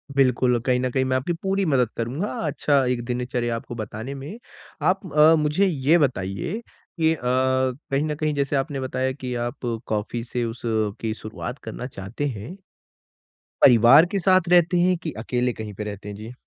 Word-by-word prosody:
बिल्कुल, 125 -2 +3
कहीं 125 -1 +2
न 130 0 0
कहीं 130 0 +1
मैं 130 0 0
आपकी 155 +7 -2
पूरी 195 0 +1
मदद 130 -7 +2
करूँगा 130 - -2 0.2
अच्छा 140 -1 +2
एक 125 -1 -1
दिनचर्या 125 -1 -2
आपको 120 +1 -7
बताने 110 +4 -6
में। 150 - -8 0.4
आप 190 +1 +2
अ, 155 +2 +7
मुझे 150 +6 +2
ये 155 -1 +3
बताइए 130 - -1 0.4
कि 160 0 +4
अ, - - -14
कहीं 130 +2 0
न 150 -1 -2
कहीं 155 0 -1
जैसे 140 0 0
आपने 135 0 -1
बताया 130 0 -1
कि 130 -2 -6
आप 135 - -7 0.3
कॉफ़ी 110 +2 -2
से 120 0 -3
उस 115 +1 -6 0.4
की 110 -1 -1
शुरुआत 115 +4 -7
करना 125 - -6
चाहते 110 +5 -5
हैं। 120 - -7 1.0
परिवार 125 +6 +8
के 200 - 0
साथ 185 -1 +3
रहते 175 0 +4
हैं 180 0 +3
कि 160 - -3
अकेले 125 +2 -1
कहीं 110 -2 -7
पे 105 - -5
रहते 105 0 -7
हैं? 100 - -6
जी। 110 +4 -9
130 Hz, 180 wpm, -23 LUFS, 120-150 Hz, 1.0 s, परिवार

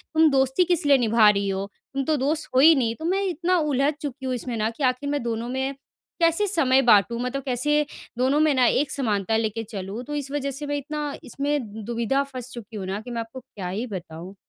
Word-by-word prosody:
तुम 320 0 +6
दोस्ती 265 +4 +3
किस 340 -2 0
लिए 285 -1 +6
निभा 225 -3 +5
रही 200 -1 +1
हो? 195 0 -2 0.3
तुम 275 0 -1
तो 310 +1 +1
दोस्त 295 +4 -1
हो 260 - +6
ही 320 +3 +8
नहीं।" 230 -4 0
तो 320 - -5
मैं 385 +3 +1
इतना 355 +1 +1
उलझ 290 -1 +1
चुकी 275 -2 -6
हूँ 260 - -1
इसमें 240 -1 -4
ना, 215 0 0
कि 230 +5 -6
आखिर 255 +2 0
मैं 290 -3 -1
दोनों 235 0 -3
में 265 +2 -2 0.5
कैसे 335 +5 +3
समय 270 -7 +4
बाँटू? 230 0 +5
मतलब 250 +2 -3
कैसे 295 +4 +1 0.3
दोनों 260 +4 +2
में 310 -1 +4
ना, 255 -2 +3
एक 265 +4 +2
समानता 220 -5 0
लेके 225 0 -2
चलूँ? 205 +2 -6
तो 295 +3 -5
इस 280 -1 -4
वज़ह 280 -1 -2
से 290 +2 -5
मैं 290 - -1
इतना 295 +1 -4
इसमें 265 -6 -3
दुविधा 235 +4 0
फ़ँस 255 -3 -7
चुकी 230 -2 -9
हूँ 195 - -5
ना, 195 +2 -3
कि 245 +2 -9
मैं 230 -1 -2
आपको 225 +3 -8
क्या 210 -7 -8
ही 215 +7 -3
बताऊँ। 180 -1 -8
260 Hz, 230 wpm, -24 LUFS, 225-290 Hz, 0.5 s, ही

